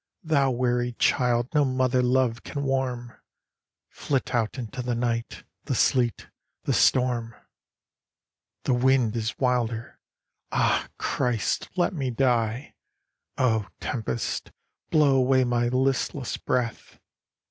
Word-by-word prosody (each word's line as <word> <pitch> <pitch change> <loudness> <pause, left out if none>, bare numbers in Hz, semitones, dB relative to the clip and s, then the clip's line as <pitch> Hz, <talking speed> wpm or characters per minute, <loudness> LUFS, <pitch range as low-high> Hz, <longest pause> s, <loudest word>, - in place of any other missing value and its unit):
Thou 145 -4 +2
weary 125 -1 0
child 120 +1 +1
no 150 -1 +4
mother 130 -1 +1
love 125 -1 +1
can 140 - -5
warm, 130 -3 -2 0.7
Flit 135 -2 -2
out 115 +1 0
into 125 +1 -5
the 120 -1 -2
night, 115 -1 -2 0.2
the - - -1
sleet, 120 -3 +1 0.4
the - - 0
storm. 120 -3 +2 0.6
" - - -62
The 130 - +1
wind 125 -2 +2
is 110 -1 -2
wilder. 120 -3 -1 0.5
Ah, - - +1
Christ, 120 -4 -1
let 180 +2 +1
me 135 -6 -2
die! 120 0 0 0.6
Oh, 110 -5 +1
Tempest, 115 -1 -3 0.4
blow 145 -3 +4
away 130 0 +4
my 120 -1 +1
listless 130 +1 0
breath! 120 -3 -3
125 Hz, 115 wpm, -26 LUFS, 120-130 Hz, 0.7 s, no